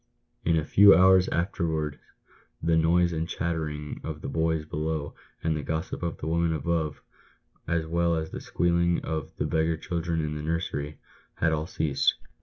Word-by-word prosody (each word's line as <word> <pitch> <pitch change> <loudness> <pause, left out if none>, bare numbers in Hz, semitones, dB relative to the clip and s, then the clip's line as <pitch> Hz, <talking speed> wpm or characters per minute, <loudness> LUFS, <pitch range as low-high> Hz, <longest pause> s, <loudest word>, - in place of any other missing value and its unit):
In 80 0 +2
a 80 - 0
few 100 +5 +7
hours 95 0 +6
afterwards 80 -4 -1 0.6
the 80 0 +2
noise 85 +2 +3
and 80 +1 -2
chattering 75 -3 -3
of 80 -1 -5
the - - -5
boys 80 +1 0
below, 75 -1 -3 0.3
and 80 -1 +1
the 75 - -2
gossip 80 +4 -3
of 85 -2 -3
the - - -7
women 85 +1 +1
above, 80 0 -2 0.6
as 85 -1 0
well 85 +1 +1
as 80 0 -3
the - - -6
squealing 85 0 +1
of 80 -3 -4
the - - -1
beggar 80 0 +1
children 85 -1 -2
in 75 -1 -2
the 75 - -4
nursery, 75 -2 -3 0.4
had 80 - +1
all 80 0 -1
ceased. 75 -5 +1
80 Hz, 170 wpm, -27 LUFS, 75-85 Hz, 0.6 s, few